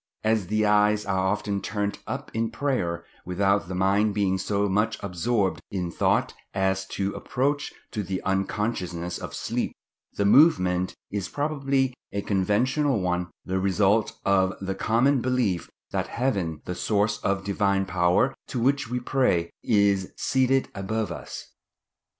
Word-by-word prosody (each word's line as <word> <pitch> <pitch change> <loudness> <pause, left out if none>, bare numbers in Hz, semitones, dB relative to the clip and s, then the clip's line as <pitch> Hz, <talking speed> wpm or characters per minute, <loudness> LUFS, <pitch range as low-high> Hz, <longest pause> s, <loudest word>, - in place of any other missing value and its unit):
As 110 -3 +1
the 110 +2 +1
eyes 105 0 +3
are 95 -2 0
often 100 0 -1
turned 105 -1 -2
up - - -5
in 115 0 0
prayer, 115 -9 -1 0.2
without 100 +2 +1
the 95 - -4
mind 100 +3 +2
being 95 -2 +1
so 100 +2 0
much 105 +3 +1
absorbed 100 +2 0
in 90 -3 -3
thought - - +1 0.2
as 95 0 0
to 100 +1 -2
approach 145 +3 -1 0.2
to 110 - -2
the 95 -1 -3
unconsciousness 95 -3 -2
of - - -6
sleep, - - -2 0.4
the 100 - 0
movement 95 - +4 0.2
is 100 -2 -3
probably 140 -3 0 0.2
a 100 0 -2
conventional 115 +7 +1
one—the 90 +1 -2
result 100 +3 +2
of 95 -1 +3
the 95 0 -3
common 120 +7 +2
belief 120 -9 0 0.2
that - - -1
Heaven, 95 - -1
the 90 - -3
source 105 +3 0
of 100 -1 -1
Divine 100 -1 +1
power 90 +7 +2
to 125 - -3
which 135 0 +1
we 125 +1 -1
pray, 120 -10 +1
is 100 -3 +2
seated 130 0 +2
above 100 0 -2
us. - - -8
100 Hz, 145 wpm, -26 LUFS, 95-115 Hz, 0.4 s, movement